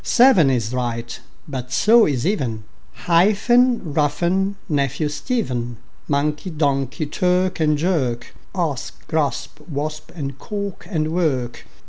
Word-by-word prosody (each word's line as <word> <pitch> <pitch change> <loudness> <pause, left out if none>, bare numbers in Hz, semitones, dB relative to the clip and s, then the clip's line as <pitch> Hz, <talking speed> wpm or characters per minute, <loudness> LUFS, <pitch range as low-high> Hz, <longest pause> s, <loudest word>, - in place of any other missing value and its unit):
Seven 235 - +5
is 120 -2 0
right, 120 -2 -3 0.3
but 130 -3 -5
so 225 +1 +5
is 130 -5 -1
even; 130 - -1 0.4
Hyphen, 210 - +3
roughen, 170 +7 +1
nephew, 145 0 0
Stephen; 130 - -2 0.3
Monkey, 150 +4 0
donkey; 140 -2 0
clerk 180 +4 +1
and 150 -1 +2
jerk; 140 -8 -1 0.2
Asp, 160 -8 -3
grasp, 150 -2 -1
wasp; 155 +1 -4
and 140 -4 -5
cork 200 -2 -5
and 155 -4 -1
work. 135 -9 -1
150 Hz, 115 wpm, -21 LUFS, 135-180 Hz, 0.4 s, Seven